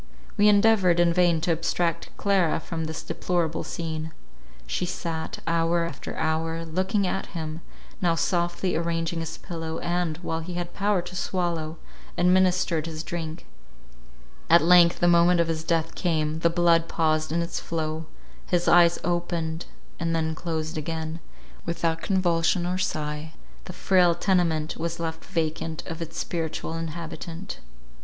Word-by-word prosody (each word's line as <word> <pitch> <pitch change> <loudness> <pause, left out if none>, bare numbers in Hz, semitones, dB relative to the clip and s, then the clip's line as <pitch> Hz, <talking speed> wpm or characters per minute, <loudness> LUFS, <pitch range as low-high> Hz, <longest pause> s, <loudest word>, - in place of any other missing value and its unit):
We 210 - +4
endeavoured 200 -4 +5
in 170 -1 +4
vain 175 -2 +3
to 170 - +1
abstract 170 +1 0
Clara 190 -6 +2
from 160 0 -4
this 160 0 -5
deplorable 170 -3 -1
scene. 160 -2 -4 0.5
She - - -2
sat, 165 -2 -4
hour 165 +1 +2
after 150 -5 -6
hour, 160 +1 -1
looking 190 +5 0
at 190 - -2
him, 160 0 -5 0.4
now 170 -2 +3
softly 175 +2 0
arranging 165 0 -1
his 160 0 -5
pillow, 165 -2 -5
and, 175 -2 -1
while 160 -1 -2
he 175 +2 -6
had 175 0 -4
power 200 -3 +1
to 180 - -9
swallow, 170 -4 -2 0.4
administered 180 -3 +3
his 160 -1 -5
drink. 165 -2 -5 1.0
At 170 0 +7
length 175 0 +6
the 175 - +5
moment 175 0 +5
of 170 - +3
his 160 -1 -2
death 165 -1 0
came: 155 -3 0
the 170 - +3
blood 170 -1 +3
paused 155 -2 +1
in 170 +1 +1
its 170 - -3
flow 160 -1 -3 0.4
—his 175 -1 +1
eyes 170 0 +6
opened, 170 -1 -2 0.3
and 165 0 0
then 160 -1 0
closed 160 -1 -3
again: 160 +1 -4 0.4
without 165 -1 -1
convulsion 175 -2 +2
or 180 +1 -1
sigh, 155 -3 -3 0.3
the - - -6
frail 180 -3 +4
tenement 165 -5 +1
was 170 0 -3
left 165 -1 -4
vacant 160 -3 -2
of 165 -1 -6
its 165 0 -6
spiritual 165 -1 -3
inhabitant. 165 +2 -6
165 Hz, 150 wpm, -26 LUFS, 160-175 Hz, 1.0 s, At